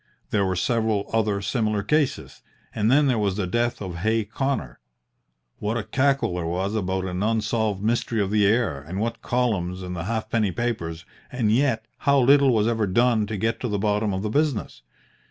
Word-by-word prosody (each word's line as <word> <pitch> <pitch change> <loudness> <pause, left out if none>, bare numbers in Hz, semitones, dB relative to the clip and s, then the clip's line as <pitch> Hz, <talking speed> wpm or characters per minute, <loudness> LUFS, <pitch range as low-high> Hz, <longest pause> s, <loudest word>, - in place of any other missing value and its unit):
There 100 -2 +2
were 95 - -1
several 110 +1 0
other 105 -3 +1
similar 105 -2 0
cases, 140 +2 -1 0.3
and 110 +1 +1
then 145 +4 +5
there 125 -5 +2
was 100 -2 0
the 100 - 0
death 120 +5 -1
of 90 -3 -6
Hay 110 +5 +1
Connor. 115 - -3 0.8
What 105 +3 -1
a 115 - -2
cackle 135 -4 +1
there 90 -1 -3
was 95 +4 -2
about 95 -3 -1
an 90 0 -3
unsolved 110 -2 0
mystery 115 0 0
of 100 -1 0
the 105 -1 +3
air, 110 - +1
and 85 +7 -6
what 115 +2 -2
columns 95 -7 -1
in 90 0 -5
the 85 -1 -4
halfpenny 110 -1 -1
papers, 85 -8 -3 0.3
and 120 -5 0
yet 120 -2 +1
how 140 -1 +3
little 140 +1 +5
was 110 -2 +2
ever 110 -3 +1
done 115 +2 +2
to 105 0 -4
get 115 +3 -1
to 125 - -2
the 105 -3 -1
bottom 105 +1 0
of 95 +1 -3
the 105 - -2
business! 140 - -1
110 Hz, 190 wpm, -24 LUFS, 100-120 Hz, 0.8 s, then